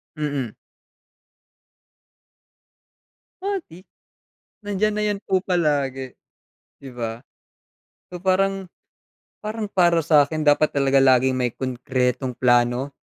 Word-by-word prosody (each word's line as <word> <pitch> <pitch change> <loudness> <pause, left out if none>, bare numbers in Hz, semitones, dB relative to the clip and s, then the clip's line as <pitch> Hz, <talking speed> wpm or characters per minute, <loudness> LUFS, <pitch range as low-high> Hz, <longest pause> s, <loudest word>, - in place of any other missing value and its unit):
Mm. 145 -6 -3 2.9
O, 395 0 -2
di 180 +4 -14 0.8
nandiyan 205 +1 0
na 210 - -2
yan 205 -1 0
po 190 -1 +1
palagi, 145 -8 -1 0.7
di 140 - -11
ba? 115 -2 -5 0.9
So 180 +1 -10
parang 195 0 +1 0.7
parang 215 -1 -5
para 170 -3 +3
sakin 155 0 +3
dapat 150 +1 +3
talaga 135 -1 +3
laging 130 -1 +4
may 125 -2 -1
konkretong 125 0 -2
plano 120 +2 +2
145 Hz, 95 wpm, -22 LUFS, 130-190 Hz, 2.9 s, laging